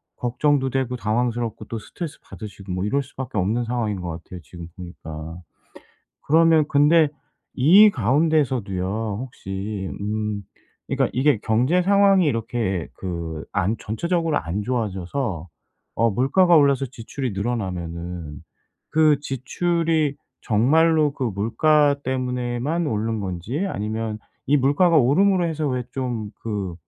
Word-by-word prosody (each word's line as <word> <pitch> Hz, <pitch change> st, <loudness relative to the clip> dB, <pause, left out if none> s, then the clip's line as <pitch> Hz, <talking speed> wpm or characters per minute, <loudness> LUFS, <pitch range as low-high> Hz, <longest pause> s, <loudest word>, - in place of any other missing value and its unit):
걱정도 130 Hz, +3 st, +1 dB
되고 130 Hz, -1 st, -1 dB
당황스럽고 115 Hz, 0 st, -1 dB
또 115 Hz, -, -5 dB
스트레스 150 Hz, +9 st, -7 dB
받으시고 100 Hz, -3 st, -9 dB
뭐 90 Hz, +2 st, -2 dB
이럴 140 Hz, +7 st, 0 dB
수밖에 130 Hz, -4 st, -7 dB
없는 110 Hz, +6 st, 0 dB
상황인 115 Hz, -5 st, -2 dB
것 90 Hz, -, -4 dB
같아요 85 Hz, +2 st, -8 dB
지금 85 Hz, +4 st, -10 dB
보니까. 80 Hz, -2 st, -8 dB, 0.9 s
그러면 160 Hz, 0 st, +5 dB
근데 150 Hz, +2 st, +5 dB, 0.5 s
이 190 Hz, +11 st, +7 dB
가운데서도요 115 Hz, -, 0 dB
혹시 100 Hz, -4 st, -5 dB
음 105 Hz, 0 st, -2 dB, 0.5 s
그러니까 -, -, +1 dB
이게 140 Hz, -3 st, +3 dB
경제 125 Hz, +11 st, +2 dB
상황이 195 Hz, -1 st, +4 dB
이렇게 115 Hz, -, -1 dB
그 85 Hz, -4 st, -5 dB
안 100 Hz, +3 st, 0 dB
전체적으로 165 Hz, -, -1 dB
안 90 Hz, +5 st, -3 dB
좋아져서 100 Hz, -, -3 dB, 0.5 s
어 115 Hz, +1 st, +2 dB
물가가 160 Hz, -, +4 dB
올라서 140 Hz, -2 st, +4 dB
지출이 125 Hz, 0 st, -5 dB
늘어나면은 90 Hz, -, -4 dB, 0.5 s
그 155 Hz, -2 st, +4 dB
지출이 155 Hz, +2 st, 0 dB, 0.3 s
정말로 150 Hz, +7 st, +3 dB
그 135 Hz, -, -4 dB
물가 140 Hz, +8 st, +2 dB
때문에만 125 Hz, +5 st, -1 dB
오른 110 Hz, -2 st, -1 dB
건지 100 Hz, -, -3 dB
아니면 110 Hz, -, -3 dB, 0.3 s
이 145 Hz, -, +5 dB
물가가 145 Hz, +6 st, +3 dB
오름으로 175 Hz, +8 st, +3 dB
해서 160 Hz, -2 st, -2 dB
왜 125 Hz, -1 st, -2 dB
좀 120 Hz, -6 st, -3 dB
그 100 Hz, -6 st, -3 dB
120 Hz, 290 characters per minute, -23 LUFS, 100-145 Hz, 0.9 s, 이